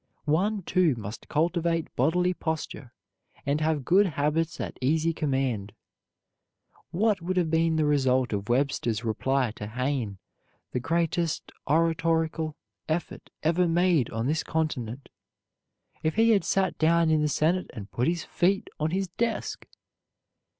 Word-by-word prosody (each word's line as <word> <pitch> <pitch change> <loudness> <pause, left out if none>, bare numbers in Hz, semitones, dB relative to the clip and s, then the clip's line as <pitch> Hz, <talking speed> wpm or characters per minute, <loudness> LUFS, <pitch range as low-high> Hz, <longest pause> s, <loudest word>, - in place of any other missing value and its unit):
One, 190 +7 +1
too, 175 -6 +2
must 105 -1 -8
cultivate 165 +1 0
bodily 180 +7 +2
posture, 160 -7 -4 0.5
and 145 +2 0
have 155 -4 0
good 195 +3 +5
habits 155 +1 -1
at - - -5
easy 160 +5 +2
command. 130 - -1 1.2
What 205 +1 +1
would 185 +2 -2
have 170 -3 +1
been 165 0 +2
the 155 -1 +2
result 130 -4 +2
of 100 +1 -3
Webster's 120 -3 0
reply 130 +2 0
to 105 -1 -7
Hayne, 125 -3 -2 0.5
the - - -1
greatest 165 +2 -1 0.2
oratorical 160 0 +1 0.3
effort 160 +2 -3
ever 170 +3 +3
made 170 -6 +3
on 115 +1 -3
this 155 +4 +1
continent, 135 -6 -3 0.9
if 155 - 0
he 225 +1 +5
had 205 -3 +3
sat 190 -2 0
down 165 0 +4
in 155 -1 +3
the 150 - +1
Senate 170 +5 +1
and 105 -2 -9
put 125 - 0
his 170 0 0
feet 190 +3 0
on 155 +1 +1
his 190 +3 -1
desk? 225 +7 -3
160 Hz, 140 wpm, -27 LUFS, 135-170 Hz, 1.2 s, good